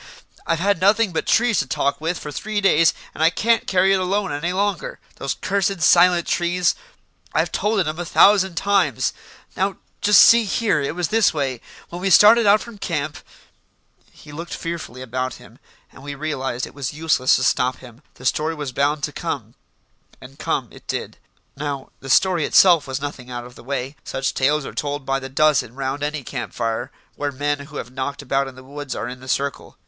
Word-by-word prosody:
I've 165 - +1
had 195 +1 0
nothing 205 +1 +3
but - - -2
trees 235 -2 +3
to 140 - -1
talk 140 +4 -1
with 165 +2 -1
for 150 - -7
three 215 +8 -3
days, 165 -5 +4 0.2
and - - -7
I 160 - +6
can't 230 +6 +1
carry 190 +1 +3
it 195 - +2
alone 195 +1 -1
any 145 +5 -2
longer. 205 - -2 0.2
Those - - -3
cursed, 195 -1 -1
silent 175 +1 +5
trees 175 +1 +1 0.6
I've - - +1
told 210 0 0
it 185 - +2
'em 155 +2 -4
a - - -2
thousand 190 +1 +4
times. 200 +3 +1 0.4
Now, 195 +1 -1 0.2
just 210 0 +6
see 230 -1 +6
here, 205 -6 +1
it 140 +3 -3
was 175 -2 -1
this 225 -6 +3
way. 135 -5 -2 0.3
When 175 +1 -7
we 195 - 0
started 215 +4 +7
out 205 +1 +5
from 230 -3 -11
camp 155 -5 -3 0.5
" - - -37
He 150 - -15
looked 165 +4 -6
fearfully 165 -7 -6
about 130 +1 -3
him, - - -16 0.3
and - - -15
we 140 0 -6
realised 135 -4 -3
it - - -13
was 140 -1 -4
useless 155 -5 +2
to 130 - -1
stop 130 0 +2
him. 125 0 -15
The 130 - -13
story 155 +5 0
was 145 -3 -5
bound 140 +3 0
to - - -1
come, - - -5 0.7
and - - -14
come - - -1
it - - -16
did. - - -4 0.4
Now, 140 -2 -5
the 135 - -10
story 175 +4 +3
itself 170 -2 +5
was 135 +1 -4
nothing 140 -3 -6
out 120 -1 -6
of 125 - -12
the - - -14
way; 135 +1 -4
such 135 0 -2
tales 145 +2 +1
are - - -7
told 145 -2 -3
by 135 0 0
the 130 0 -8
dozen 140 -4 +2
round 135 +1 -3
any 145 -1 -3
camp 120 -1 -6
fire 115 -1 -2 0.3
where 145 0 -2
men 145 +2 -1
who 150 - -14
have 125 - -6
knocked 140 +2 -4
about 135 0 0
in 135 - -10
the 130 - -13
woods 145 +1 -7
are - - -4
in 125 +1 -7
the 130 - -13
circle. 140 +1 -3
150 Hz, 205 wpm, -21 LUFS, 135-185 Hz, 0.7 s, started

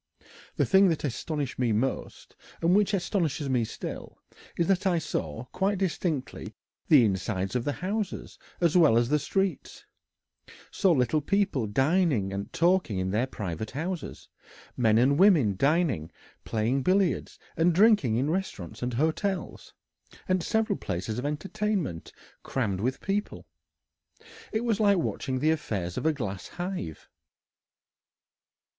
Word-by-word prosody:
The - - +2
thing 195 0 +5
that 160 - -1
astonished 140 0 -3
me 120 -3 +2
most, 115 +5 -3 0.2
and 170 +3 +3
which 210 0 +3
astonishes 170 -7 -1
me 125 -3 +2
still, 110 - -7 0.4
is 170 - +2
that 195 +1 +1
I 175 -2 +2
saw 80 - -3
quite 195 +1 0
distinctly 170 -6 -3 0.3
the 140 -7 +7
insides 95 0 -2
of 125 - -1
the 145 - +1
houses 205 0 -3 0.2
as 170 -2 +2
well 155 -10 +6
as 120 0 +2
the 150 +1 +3
streets, 195 +4 -2 0.9
saw 190 - +2
little 135 0 +2
people 190 - 0
dining 135 - +1
and 100 +1 -5
talking 175 - +2
in 95 0 -1
the 115 +6 +1
private 105 -4 -5
houses, 165 +4 -5 0.5
men 110 -3 +3
and 135 +5 +3
women 160 - +5
dining, 140 - +1 0.3
playing 115 +5 0
billiards, 185 +4 +1 0.2
and 165 +2 +3
drinking 190 - +4
in 135 +6 +1
restaurants 170 - -4
and 125 0 -2
hotels, 170 - -2 0.5
and 185 -1 +1
several 220 +2 0
places 95 +5 -3
of 135 - -2
entertainment 180 - -3 0.3
crammed 100 -8 -2
with 130 +4 -2
people. 205 +1 -3 1.1
It 220 - 0
was 225 -3 0
like 200 -2 +4
watching 135 -5 -2
the 155 +5 +2
affairs 100 - -3
of - - -1
a - - +4
glass 100 -10 -5
hive." 175 - -6
150 Hz, 140 wpm, -27 LUFS, 115-185 Hz, 1.1 s, the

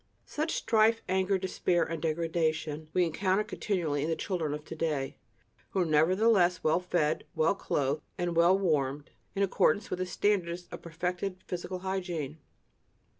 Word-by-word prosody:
Such 310 +2 -2
strife, 225 0 +3
anger, 190 +1 +2
despair 180 -2 0
and 165 -1 -4
degradation 160 -1 -1
we 180 - +3
encounter 190 +5 +1
continually 170 -10 -1
in 155 - -1
the 165 - +1
children 160 -6 -2
of 150 +1 -9
to - - -7
day, 150 -4 -2 0.5
who 190 - 0
are - - +2
nevertheless 180 +4 +3
well 160 +2 +3
fed, 175 -4 0
well 160 +4 +3
clothed 145 -6 -1 0.2
and 175 -1 -1
well 170 +3 +5
warmed, 145 -6 0 0.2
in 200 - +2
accordance 200 +1 +2
with 180 - -2
the 185 - -1
standards 180 -3 0
of - - -7
perfected 180 +3 -3
physical 180 +1 -4
hygiene. 175 -6 -3
175 Hz, 155 wpm, -30 LUFS, 155-190 Hz, 0.5 s, well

